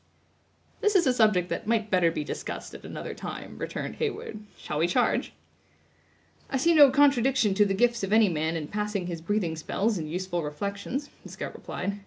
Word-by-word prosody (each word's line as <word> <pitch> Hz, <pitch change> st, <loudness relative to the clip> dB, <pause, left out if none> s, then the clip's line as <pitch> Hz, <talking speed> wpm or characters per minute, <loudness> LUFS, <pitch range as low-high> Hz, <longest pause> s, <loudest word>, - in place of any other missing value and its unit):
"This 420 Hz, -1 st, +1 dB
is 350 Hz, -3 st, +5 dB
a 255 Hz, -, +4 dB
subject 215 Hz, -7 st, +3 dB
that -, -, -4 dB
might 220 Hz, -2 st, 0 dB
better 180 Hz, -3 st, +4 dB
be 165 Hz, -, -3 dB
discussed -, -, -6 dB
at -, -, -10 dB
another -, -, -6 dB
time," -, -, -7 dB
returned -, -, -5 dB
Heyward; 425 Hz, -, -3 dB, 0.2 s
"shall 150 Hz, -, -4 dB
we 165 Hz, -, +3 dB
charge?" 175 Hz, -, +1 dB, 1.2 s
"I 270 Hz, -, 0 dB
see 335 Hz, +6 st, +3 dB
no 290 Hz, -3 st, +8 dB
contradiction 265 Hz, -5 st, +3 dB
to 205 Hz, +1 st, +4 dB
the 195 Hz, -1 st, 0 dB
gifts 240 Hz, +3 st, +2 dB
of 195 Hz, -, -2 dB
any 220 Hz, 0 st, +6 dB
man 160 Hz, -1 st, -1 dB
in 155 Hz, -2 st, -3 dB
passing 210 Hz, -1 st, -2 dB
his 170 Hz, -2 st, -5 dB
breathing 175 Hz, -2 st, -1 dB
spells 200 Hz, +6 st, -1 dB
in 155 Hz, -, -4 dB
useful 175 Hz, +1 st, -2 dB
reflections," 200 Hz, -, -4 dB
the -, -, -12 dB
scout -, -, -6 dB
replied. 200 Hz, +2 st, -5 dB
205 Hz, 190 wpm, -27 LUFS, 175-240 Hz, 1.2 s, no